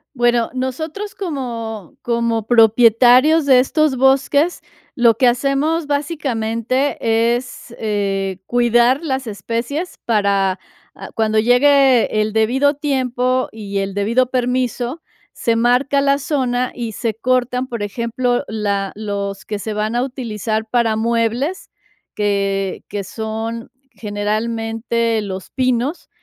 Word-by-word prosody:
Bueno, 240 -1 +2
nosotros 315 +11 -4
como 235 - -5
como 235 -2 -1
propietarios 245 +6 +5
de 260 -2 +6
estos 300 +1 +2
bosques, 275 +5 +2 0.4
lo 235 -3 +4
que 260 - +3
hacemos 275 +6 +1
básicamente 265 -4 -1 0.4
es, 250 -1 -10
eh, 195 -3 -2
cuidar 240 +3 +3
las 265 -3 -2
especies 230 - -4
para, 200 -4 +1 0.4
ah, 195 - -10
cuando 220 -1 +2
llegue 255 -1 +4
el 215 0 -2
debido 260 +6 +2
tiempo 255 -3 0
y 200 -2 -5
el 195 0 -2
debido 235 +5 +1
permiso, 250 +3 -1 0.3
se 230 -1 -1
marca 250 +4 +2
la 280 0 +3
zona 255 -3 -1
y 235 -3 -4
se 225 +1 -2
cortan, 250 +2 0
por 235 -4 -5
ejemplo, 235 +4 -1
la 200 -3 -1
los 200 -2 -4
que 210 -1 -4
se 220 - -5
van 215 +2 -2
a 245 - +1
utilizar 225 -4 -3
para 230 -2 +1
muebles, 235 - -1 0.5
que 200 -2 -1
que 200 -1 -4
son 225 +3 -5 0.2
generalmente 225 +2 -2
los 190 -2 -6
pinos. 255 +4 -1
235 Hz, 120 wpm, -18 LUFS, 220-260 Hz, 0.5 s, de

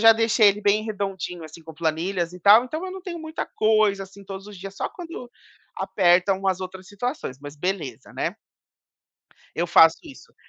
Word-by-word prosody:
já 225 0 +9
deixei 225 -1 +3
ele 200 +1 0
bem 210 +1 +3
redondinho, 195 -5 -4
assim, 155 +1 -11
com 160 0 -11
planilhas 170 +2 -1
e 180 - -10
tal, 210 +7 +7
então 315 +8 -5
eu 370 - -6
não 380 - -8
tenho 350 -2 -6
muita 315 0 -5
coisa, 215 -2 +2
assim, 195 +1 -15
todos 195 0 -8
os 210 -2 -10
dias. 195 +2 -9
Só - - -2
quando 330 -8 -9 0.5
apertam 185 +1 +3
umas 190 -1 0
outras 185 0 -7
situações, 205 - -4
mas 145 +1 -9
beleza, 190 +6 -4
né. - - -3 1.2
Eu 175 +1 0
faço 165 -1 +7
isso. 295 -4 -14
195 Hz, 185 wpm, -24 LUFS, 180-225 Hz, 1.2 s, já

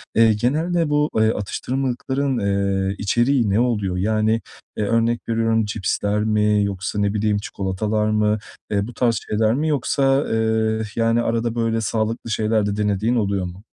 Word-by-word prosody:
Eee, 110 -1 +5
genelde 155 +8 0
bu, 150 +1 +2
eee, 110 0 +4
atıştırmalıkların, 130 +5 -2
eee, 100 -1 0
içeriği 120 +2 +1
ne 100 +4 +2
oluyor? 105 -7 0
Yani, 110 +3 +1 0.4
eee, 105 - 0
örnek 115 +1 +1
veriyorum 115 -1 +1
cipsler 105 0 -1
mi 105 -1 +2
yoksa, 100 0 -3
ne 100 0 +1
bileyim, 105 -1 +1
çikolatalar 105 +2 -2
mı? 105 0 +2 0.3
Eee, 100 +1 0
bu 120 - -9
tarz 115 -2 +1
şeyler 110 +1 +2
mi 150 +4 0
yoksa, 140 -1 +1
eee, 110 0 0
arada, 115 0 0
böyle, 115 -1 0
sağlıklı 110 +2 -2
şeyler 110 -1 +1
de 100 - -1
denediğin 105 +3 0
oluyor 100 -4 0
mu? 90 +5 -9
110 Hz, 150 wpm, -21 LUFS, 105-120 Hz, 0.4 s, Eee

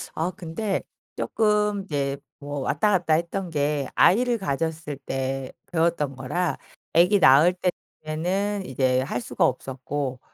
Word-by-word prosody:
아 170 +3 -1
근데 190 +4 -2 0.3
쪼끔 210 -2 +1
이제 140 -5 -2 0.2
뭐 145 0 -5
왔다 145 +9 +1
갔다 175 -5 +2
했던 170 +3 -1
게 145 -3 0
아이를 240 +4 +4
가졌을 160 -2 -2
때 135 -1 -3 0.2
배웠던 160 -5 +1
거라 150 +8 -1 0.4
아기 180 +5 +5
낳을 155 +4 +7 0.5
때에는 190 +6 -1
이제 130 0 +1
할 125 -2 -2
수가 120 - +1
없었고, 130 +1 -3
155 Hz, 245 characters per minute, -25 LUFS, 135-185 Hz, 0.5 s, 낳을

